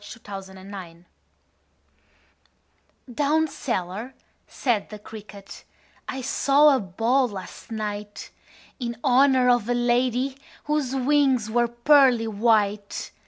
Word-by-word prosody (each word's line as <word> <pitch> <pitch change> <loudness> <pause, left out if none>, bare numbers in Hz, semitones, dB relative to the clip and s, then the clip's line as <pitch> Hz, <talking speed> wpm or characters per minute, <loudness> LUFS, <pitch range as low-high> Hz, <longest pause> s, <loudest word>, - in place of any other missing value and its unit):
The 215 +3 -11
Potato's 195 -3 -8
Dance 190 -3 -11 2.1
"Down 300 +4 +1
cellar," 235 - -4 0.3
said 235 -6 -1
the 210 - -8
cricket, 205 -2 -12 0.5
"I 265 - -4
saw 280 +3 +4
a - - 0
ball 230 +7 +1
last 195 -4 -10
night 210 -1 -5 0.5
In 235 -2 -4
honor 260 -1 +4
of 245 -2 +2
a 245 - +2
lady 245 +2 0 0.3
Whose 295 -3 -1
wings 265 -4 +2
were 240 +1 +2
pearly 240 0 +4
white. 210 -2 0
240 Hz, 110 wpm, -24 LUFS, 205-265 Hz, 2.1 s, saw